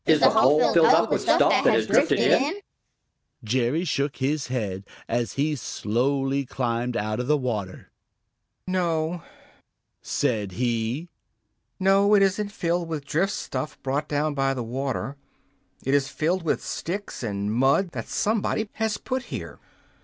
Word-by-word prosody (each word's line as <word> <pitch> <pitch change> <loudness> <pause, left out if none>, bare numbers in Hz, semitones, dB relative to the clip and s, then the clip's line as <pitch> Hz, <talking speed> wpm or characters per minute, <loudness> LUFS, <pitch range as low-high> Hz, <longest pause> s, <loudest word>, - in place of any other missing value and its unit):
"Is 155 -1 +5
the 135 - +6
hole 145 +5 +4
filled 170 -1 +6
up - - +4
with - - +1
stuff - - +4
that - - +3
has - - +2
drifted - - +3
in?" 290 +7 +3 0.9
Jerry 125 +8 0
shook 140 -4 -1
his 140 +2 -1
head, 105 -7 -3 0.2
as 120 0 -1
he 150 +2 0
slowly 135 +4 -1
climbed 120 -2 -2
out 110 0 -2
of 125 - -3
the 150 +1 +3
water. 110 -8 -4 0.7
"No," 170 -2 -1 0.8
said 105 -4 -1
he. 120 - -2 0.7
"No, 195 +2 +4
it 200 - +5
isn't 200 +2 0
filled 175 -3 -1
with 155 -4 -5
drift 170 +8 0
stuff 155 - -4
brought 140 +3 -1
down 150 +1 0
by 135 -1 0
the 125 - -3
water. 135 +3 -3 0.7
It 135 - +1
is 140 -1 +3
filled 170 +6 -1
with 165 - -1
sticks 200 +5 -5
and 105 -2 -2
mud 135 - +2
that - - -6
somebody 215 0 -1
has 220 -2 -1
put 260 0 -4
there. - - -7
140 Hz, 150 wpm, -25 LUFS, 125-170 Hz, 0.9 s, the